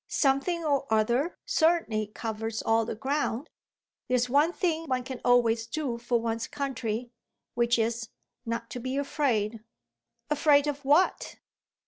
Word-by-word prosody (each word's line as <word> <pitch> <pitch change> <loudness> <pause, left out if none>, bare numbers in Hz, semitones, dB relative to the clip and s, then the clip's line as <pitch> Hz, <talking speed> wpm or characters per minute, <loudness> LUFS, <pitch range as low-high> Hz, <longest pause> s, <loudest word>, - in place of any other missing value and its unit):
"'Something 305 +5 +1
or 275 -4 0
other' 240 +9 +1
certainly 315 -11 +2
covers 220 +1 -4
all 225 0 +2
the 225 - -4
ground. 275 +2 -2 0.6
There's 250 -1 +1
one 295 +5 +4
thing 330 -3 -1
one 255 -2 0
can 255 0 -7
always 230 -2 +3
do 255 -3 -3
for 240 0 0
one's 230 0 -2
country, 245 -5 -3 0.4
which 235 0 +2
is 225 0 -1 0.3
not 230 -1 -4
to 250 - -5
be 255 +3 -3
afraid." 240 -7 0 0.7
"Afraid 295 -1 +4
of 290 -1 -3
what?" 295 +7 +2
250 Hz, 135 wpm, -28 LUFS, 230-285 Hz, 0.7 s, one